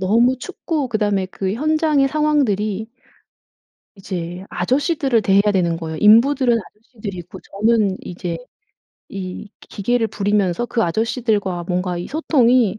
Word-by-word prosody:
너무 235 +7 +3
춥고 310 -3 -3
그다음에 205 -4 0
그 190 0 -3
현장의 305 0 +2
상황들이 220 -9 0 1.1
이제 180 -1 -6
아저씨들을 265 - +1
대해야 200 +2 +3
되는 170 -3 +1
거예요. 160 -1 -5
인부들은 240 +3 +5
아저씨들이고 205 -4 -9
저는 210 -2 +1
이제 175 -1 -5 0.7
이 190 +1 -7
기 - - -18
기계를 240 +1 +2
부리면서 205 0 0
그 230 -2 0
아저씨들과 205 -2 -1
뭔가 180 0 -2
이 175 - -5
소통이 250 - +2
210 Hz, 310 characters per minute, -20 LUFS, 185-250 Hz, 1.1 s, 인부들은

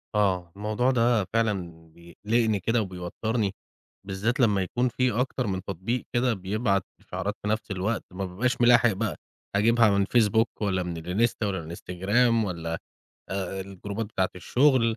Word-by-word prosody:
آه، 90 -5 +1
الموضوع 110 +5 +1
ده 120 -3 +3
فعلًا 90 -8 -1
بيقلقني 105 +5 -1
كده 115 +4 +1
وبيوتّرني 100 +3 -2 0.5
بالذّات 105 +7 -1
لمّا 105 -5 +4
يكون 125 +6 0
في 125 +2 +1
أكتر 125 +1 -1
من 95 -1 -2
تطبيق 100 +6 -3
كده 120 0 +2
بيبعت 100 0 0 0.2
إشعارات 105 - -4
في 105 - -4
نَفْس 110 -1 -1
الوقت 100 +4 -1
ما 95 +1 -3
بابقاش 120 +8 -1
ملاحق 120 -1 +6
بقى، 95 -4 -2 0.4
هاجيبها 115 +2 +5
من 100 -1 +3
فيسبوك 110 +1 +3
والّا 95 -3 +1
من 85 -1 -4
الإنستا 100 +7 0
والّا 95 -2 -1
من 80 - -8
الإنستجرام 100 +8 +1
والّا 85 -3 -4
آآ - - -1 0.5
آآ 95 0 -3
الجروبات 100 +3 -5
بتاعة 95 -3 -1
الشُغل 125 +2 +3
105 Hz, 155 wpm, -26 LUFS, 95-115 Hz, 0.5 s, ملاحق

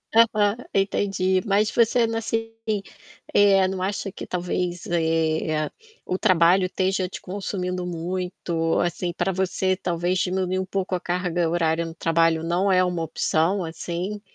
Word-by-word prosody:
aham, 215 -2 +4 0.2
entendi, 195 -1 +1
mas 210 +1 +2
você, 235 +1 +3 0.2
assim, 225 0 -2 1.2
não 190 -1 -4
acha 195 +1 -2
que - - -8
talvez, 180 0 -2
eh, 160 -2 0 0.4
o 185 - -1
trabalho 185 -1 +4
esteja 185 0 0
te 180 - -9
consumindo 180 -2 -3
muito, 175 -1 -2
assim, 175 0 -1
pra 185 +2 0
você 190 0 0
talvez 175 0 -1
diminuir 185 +1 0
um 190 - -2
pouco 190 0 -3
a - - -2
carga 175 -2 -1
horária 165 -1 +1
no 165 0 -8
trabalho, 165 -1 +2
não 180 +4 +1
é 185 0 +4
uma 175 -2 -1
opção, 165 +4 0
assim? 175 +5 -4
180 Hz, 140 wpm, -24 LUFS, 170-190 Hz, 1.2 s, aham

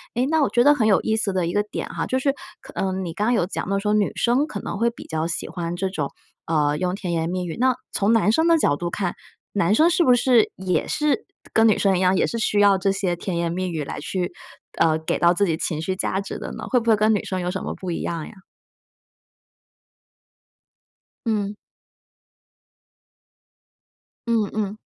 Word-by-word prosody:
诶， 245 +2 +2
那 315 +2 +2
我 275 - +2
觉 240 0 +3
得 290 +1 +7
很 220 -6 +1
有 200 - +4
意 220 - 0
思 215 -3 -1
的 185 -2 0
一 170 - -2
个 205 - +3
点 210 - -5
哈， - - -3
就 260 - 0
是 275 +1 +2 0.3
可 - - -13
嗯， 190 -1 -2
你 165 - -5
刚 210 - -1
刚 245 - +3
有 205 -7 +2
讲 185 - -4
到 195 - +1
说， 210 +1 0
女 210 -2 +2
生 250 +5 +2
可 205 - -5
能 200 - -5
会 235 +1 +3
比 235 - -11
较 160 0 -2
喜 170 - -4
欢 170 -1 -4
这 190 +2 -1
种 150 -7 -3 0.4
呃， 150 -2 +1
用 180 0 0
甜 180 -4 -4
言 165 0 -1
蜜 180 0 -2
语， 165 - -5
那 255 0 +3 0.2
从 200 +2 +1
男 215 -1 +4
生 320 +7 +2
的 335 -1 +5
角 145 - +2
度 175 +3 -3
看， 180 0 -2 0.4
男 205 -1 +2
生 320 +7 +5
是 345 0 +3
不 250 -3 +5
是 245 -2 +3
也 185 -1 -1
是 300 +8 0 0.3
跟 225 0 +5
女 215 - +4
生 195 -2 +2
一 185 - -1
样， 185 +1 +3
也 - - +3
是 230 - -3
需 210 -2 +1
要 200 -1 +6
这 195 0 +2
些 195 -3 -1
甜 175 0 -4
言 170 -1 -1
蜜 185 +1 -2
语 160 -3 -3
来 - - -6
去 175 +3 -3 0.5
呃， 155 -1 +4
给 160 - -2
到 170 0 +5
自 200 +3 +2
己 165 - 0
情 155 -2 -2
绪 185 +3 -2
价 190 0 -1
值 195 - -6
的 - - -6
呢？ - - -7
会 250 - +3
不 230 - -2
会 220 - +6
跟 215 +1 +3
女 205 - 0
生 185 - -3
有 180 0 -2
什 190 - -4
么 - - -4
不 185 -2 -5
一 165 - -3
样 165 -2 -3
呀？ - - -12 2.9
嗯。 210 -2 -1 2.7
嗯 225 -3 +1
嗯。 210 -1 -2
195 Hz, 245 characters per minute, -23 LUFS, 175-225 Hz, 2.9 s, 得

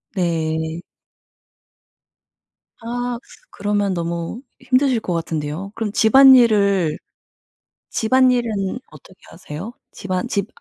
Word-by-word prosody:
네. 160 -2 -1 2.0
아. 245 +1 -3 0.3
그러면 205 -1 -1
너무 170 +5 -4 0.2
힘드실 255 -1 +2
것 185 - -4
같은데요. 165 +3 -4
그럼 220 -2 -3
집안일을 220 - +5 0.9
집안일은 235 -3 +1
어떻게 190 - -16
하세요? 165 +5 -8 0.2
집안 185 -2 -4
집 200 -1 -2
200 Hz, 190 characters per minute, -20 LUFS, 170-235 Hz, 2.0 s, 집안일을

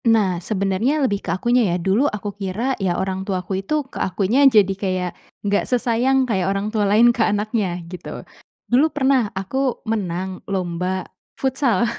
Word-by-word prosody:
Nah, 205 -6 +3
sebenarnya 200 - 0
lebih 200 -5 -1
ke - - -7
akunya 240 +5 +2
ya, 170 - +1
dulu 195 +11 +2
aku 205 -1 -5
kira 205 +7 -2
ya 180 -2 0
orang 190 0 -2
tuaku 190 -1 -2
itu 195 - -4 0.2
ke - - -6
akunya 195 +7 +1
jadi 205 -5 +4
kayak, 185 -2 0 0.4
nggak 205 0 +2
sesayang 250 +1 +2
kayak 190 -4 +1
orang 195 +1 -1
tua 210 -2 +1
lain 235 +4 +5
ke 235 - -2
anaknya 215 0 +1 0.2
gitu. 180 -2 -8 0.6
Dulu 260 +5 +5
pernah 265 -6 +2
aku 195 +7 -4 0.3
menang 190 -4 -3
lomba 185 0 -2 0.3
futsal 260 -6 +1
200 Hz, 160 wpm, -21 LUFS, 190-235 Hz, 0.6 s, lain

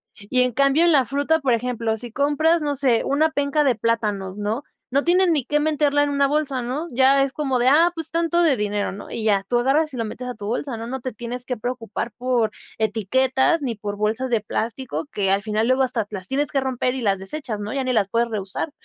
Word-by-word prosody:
Y 210 +5 0
en 250 -1 +1
cambio 275 +5 +3
en 345 - +5
la 275 -5 +4
fruta, 285 +5 +1
por 270 -5 +1
ejemplo, 230 -1 -1
si 235 0 -7
compras, 295 +5 +2
no 290 -1 -1
sé, 260 -4 +2
una 305 +3 +2
penca 285 0 +1
de 265 -4 +3
plátanos, 210 -4 -1
¿no? 215 +6 -2 0.3
No 280 +3 +1
tienen 355 0 +3
ni 290 -4 +1
qué 295 +5 0
meterla 295 -1 +2
en 290 - 0
una 280 -1 +2
bolsa, 280 -3 -1
¿no? 270 +8 -3
Ya 265 +2 +4
es 275 0 0
como 270 -4 -1
de, 245 - +2
ah, 325 +6 +5
pues 325 -2 -5
tanto 335 +1 +1
de 320 -5 +4
dinero, 205 -3 -2
¿no? 205 - -10
Y 220 - -3
ya, 200 -2 +3
tú 240 +2 +2
agarras 285 +5 +1
y - - -6
lo 230 - -1
metes 250 +3 -6
a - - -3
tu 210 -3 -9
bolsa, 245 +2 -3
¿no? 230 +1 -6
No 265 +1 -5
te 255 +1 -4
tienes 240 +3 -6
que 250 - -3
preocupar 235 -1 -4
por 245 -2 0 0.3
etiquetas 260 - +1
ni 245 -4 -2
por 205 -1 -5
bolsas 220 +5 -1
de 235 -2 +2
plástico, 230 +7 -4
que 195 -2 0
al 195 +1 +2
final 215 +1 0
luego 260 +1 +3
hasta 245 -5 -1
las 190 -3 -7
tienes 285 +2 0
que 275 - +2
romper 255 -1 -1
y 260 - -3
las 200 -4 +1
desechas, 220 +2 -5
¿no? 210 +4 -4
Ya 275 - -1
ni 255 - -1
las 215 -5 +2
puedes 235 +3 0
reusar, 210 - -4
255 Hz, 245 wpm, -22 LUFS, 220-285 Hz, 0.3 s, en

